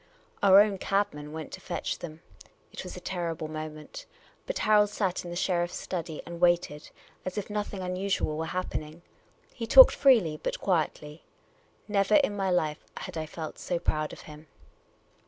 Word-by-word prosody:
Our 195 0 +8
own 205 -2 +1
cabman 150 -8 -1
went 160 0 -7
to - - -8
fetch 175 - -4
them. 160 -1 -9 0.5
It - - -7
was 185 - -8
a - - -6
terrible 170 -3 -4
moment. 155 - -8 0.4
But - - -2
Harold 210 -1 +4
sat 195 -3 -2
in 175 - -7
the 175 - -5
sheriff's 175 -1 0
study 165 -3 -5
and 170 0 -8
waited, 175 -4 +1 0.3
as 185 +2 -5
if 205 0 -4
nothing 205 -2 -3
uiuisual 180 -3 -1
were 160 +1 -3
happening. 170 -2 -5 0.5
He 230 -2 -5
talked - - +9
freely 215 - +4
but - - -3
quietly. 155 -4 -2 0.6
Never 205 0 +2
in 275 -8 +3
my 195 -1 -1
life 155 -4 0
had 185 - -7
I 160 -1 -3
felt 160 0 -7
vSo 175 -1 -3
proud 155 -1 0
of - - -10
him. 155 0 -13
175 Hz, 170 wpm, -28 LUFS, 155-200 Hz, 0.6 s, talked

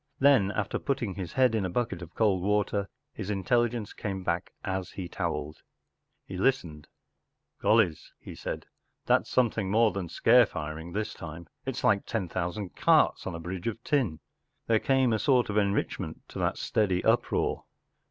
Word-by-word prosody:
Then, 135 -8 +5
after 110 - -2
putting 125 -8 -2
his 90 -2 -6
head 130 -3 +4
in 110 -3 +1
a 95 - -1
bucket 100 -3 -2
of 85 -1 -10
cold 100 -5 +2
water, 100 0 0 0.2
his 95 - -6
intelligence 115 +2 0
came 95 -2 -4
back 85 0 -1
as 95 -1 -2
he 95 -2 -5
towelled. 75 -4 -3 0.7
He 95 - -7
listened. 90 - 0 0.4
“ - - -46
Gollys! 105 -8 +3
” - - -54
he - - -9
said; - - -5 0.2
“ - - -50
that’s - - +2
something 110 -5 +1
more 110 +2 +4
than 95 -4 -4
scare 120 +6 +5
firing 80 0 -6
this 105 +2 -2
time. 85 +1 -8 0.2
It’s 135 -1 -3
like 100 -1 +3
ten 110 -6 -1
thousand 90 +3 -4
carts - - +3
on 90 - -3
a - - -5
bridge 90 +3 -5
of 115 +1 -4
tin.” 120 - 0 0.5
There 110 -1 +3
came 130 -2 +2
a 110 - +1
sort 125 -4 +3
of 105 - -1
enrichment 100 -1 -1
to - - -7
that - - 0
steady 95 -4 +1
uproar. - - +1
100 Hz, 180 wpm, -28 LUFS, 90-115 Hz, 0.7 s, Then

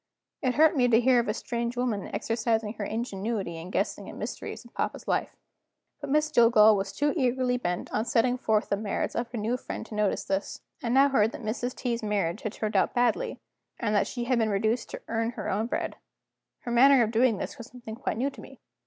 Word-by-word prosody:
It 255 -4 0
hurt 315 +2 +5
me 250 -3 +4
to 230 -2 +5
hear 250 0 +4
of 235 - -1
a 210 - +1
strange 235 0 -3
woman 235 -6 -1
exercising 225 -2 -1
her 215 - -5
ingenuity 205 -4 -3
in 165 +2 -8
guessing - - -2
at - - -9
mysteries - - -6
in - - -16
papa's - - -3
life. - - -1 0.6
But 285 -2 -6
Miss 305 +2 +2
Jillgall 230 -5 +6
was 195 0 -2
too 290 +8 0
eagerly 255 -3 +1
bent 175 -7 -3
on 215 - 0
setting 245 +1 +2
forth 215 -4 +1
the 200 - +1
merits 210 -1 -2
of 235 0 -3
her 235 +1 -1
friend 220 - -6
to 230 - -11
notice 210 -2 0
this. 195 +1 -3 0.2
I 235 - -2
now 270 +3 +5
heard 225 -4 +2
that - - -8
Mrs. 245 +4 -3
T.'s 240 -2 -2
marriage 205 -4 -1
had 215 - -4
turned 215 -1 -3
out - - +2
badly, 245 - +1 0.4
and 215 -4 0
that 205 - +2
she 240 - -4
had 245 0 +1
been 220 -1 +2
reduced 220 +4 0
to - - -8
earn 230 +1 -1
her - - -4
own 215 +4 0
bread. - - -3 0.6
Her 240 - -5
manner 260 +1 +6
of 220 - -1
doing 230 -1 +3
this - - -6
was 235 - -8
something 240 -3 -9
quite 235 - -3
new 270 +4 0
to - - -12
me. 270 - -13
235 Hz, 225 wpm, -27 LUFS, 215-250 Hz, 0.6 s, Jillgall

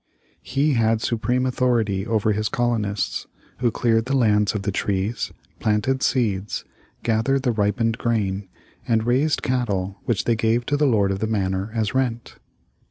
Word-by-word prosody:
He 145 +3 +1
had 115 -2 +2
supreme 125 +3 0
authority 115 -6 +1
over 110 -1 +1
his 105 +1 0
colonists, 105 -6 -1 0.3
who 120 -1 +2
cleared 115 0 +1
the 135 +1 +1
land 105 -4 +3
of 100 - -2
the 100 - -1
trees, 100 +3 -1 0.3
planted 110 +5 +1
seeds, 105 -6 0 0.4
gathered 120 +4 +1
the 125 - +2
ripened 110 +2 0
grain, 100 -4 -1 0.4
and 110 -2 +2
raised 135 +6 +2
cattle 105 -8 -1
which 115 -4 0
they 115 - +2
gave 115 +2 +1
to 145 - 0
the 145 0 +3
Lord 105 -6 +3
of 95 - -2
the 110 - -1
Manor 95 -2 -1
as 110 -1 0
rent. 125 -3 -2
115 Hz, 160 wpm, -23 LUFS, 105-120 Hz, 0.4 s, land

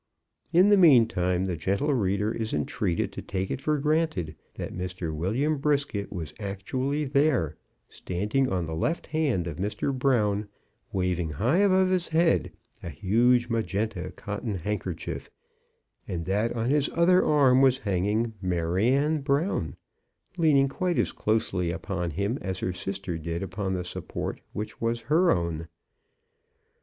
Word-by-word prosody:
In 180 +4 +6
the 205 - +6
meantime 115 - +4
the 90 -2 -2
gentle 100 - 0
reader 105 -2 0
is 110 -1 -2
entreated 85 +7 -1
to - - -7
take 95 -1 -3
it - - -3
for 150 +1 +1
granted 150 - 0 0.2
that - - -5
Mr. 90 -2 -4
William 130 - 0
Brisket 140 -8 0
was 80 -6 -5
actually 130 +9 -2
there, 135 - +2 0.3
standing 105 +9 -1
on 90 -2 0
the 80 - -5
left 155 - -1
hand 145 - 0
of 85 -2 -5
Mr. 105 +8 -2
Brown, 110 -6 +1 0.4
waving 90 -4 -1
high 125 - +2
above 190 -2 +4
his 185 -2 +1
head 165 +1 +2 0.3
a - - -6
huge 120 - +2
magenta 110 -2 -2
cotton 105 0 -4
handkerchief, 95 -1 -4 0.8
and 85 -2 -3
that 105 +5 0
on 120 +2 -1
his 145 -1 +2
other 180 +2 +5
arm 135 -4 +4
was 130 -1 +5
hanging 105 +2 0
Maryanne 105 - +1
Brown, 145 +7 0 0.6
leaning 150 -6 +4
quite 175 +5 -1
as - - +1
closely 95 -5 0
upon 90 +1 -3
him 100 - -2
as 95 -1 -3
her 90 - -2
sister 95 -1 -4
did 85 +3 -3
upon 95 0 -3
the 90 -1 -3
support 90 - -5
which 105 +1 -6
was 115 0 0
her 165 +8 +3
own. 85 -2 0
105 Hz, 145 wpm, -27 LUFS, 90-140 Hz, 0.8 s, In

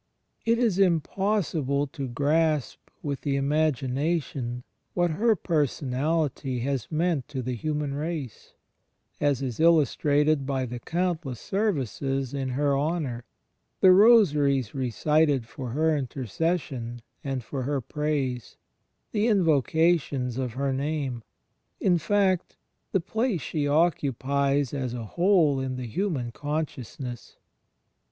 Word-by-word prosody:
It 230 0 +4
is 225 -6 +1
impossible 170 -5 +1
to 140 -1 -6
grasp 150 +3 +1 0.2
with 140 -2 -3
the 140 -2 -1
imagination 140 -2 0 0.3
what 175 -1 +2
her 220 +7 +3
Personality 145 - -1
has 135 -2 -2
meant 160 -4 0
to 130 -3 -4
the 125 +1 -2
human 150 +3 -2
race 150 -4 -5 0.3
— - - -41
as 140 -2 +1
is 125 -4 -4
illustrated 150 -2 +3
by 135 -2 0
the 120 0 -6
countless 165 -5 -2
services 135 - -1
in 135 -2 -2
her 140 +2 +1
honour, 140 -5 -2 0.5
the 190 - +7
rosaries 150 - +5
recited 140 +1 +1
for 125 +2 -7
her 155 +5 +2
intercession 130 - -3 0.2
and 135 -3 -3
for 135 +4 -4
her 140 +2 -1
praise, 135 -3 -2 0.5
the 215 +1 +1
invocations 160 - +2
of 125 -3 -2
her 135 +1 -1
name, 140 -3 -2 0.3
— - - -49
in 175 -1 +4
fact, 190 0 +1 0.4
the 190 - +2
place 220 - -1
she 145 +2 -2
occupies 140 -3 +1
as 130 -4 -3
a 115 -2 -5
whole 170 - +3
in 130 -1 -3
the 125 -1 -5
human 135 - -2
consciousness. 135 -3 -5
145 Hz, 120 wpm, -26 LUFS, 130-165 Hz, 0.5 s, the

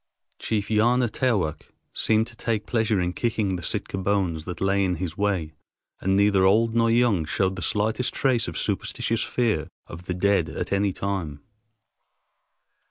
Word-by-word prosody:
Chief 105 -2 -2
Yana 120 +3 +3
Taowk 105 - 0 0.3
seemed 110 0 +2
to 120 - -12
take 110 -1 -2
pleasure 110 -3 +1
in 90 0 -1
kicking 110 -5 -1
the 90 - -5
Sitka 95 +3 -3
bones 95 -5 0
that 90 0 -6
lay 95 +1 +2
in 90 -2 0
his 85 -1 -4
way, 95 -6 -1 0.5
and 95 +1 +1
neither 100 -1 +4
old 110 +4 +4
nor 115 0 +3
young 115 -7 +3
showed 95 +5 0
the 90 - -6
slightest 110 +6 0
trace 125 -4 +1
of - - -5
superstitious 115 -1 -1
fear 110 - 0 0.2
of 85 +2 -10
the 90 - -3
dead 90 -3 +2
at 80 - -4
any 100 0 +2
time. 90 -7 -4
100 Hz, 165 wpm, -25 LUFS, 90-110 Hz, 0.5 s, neither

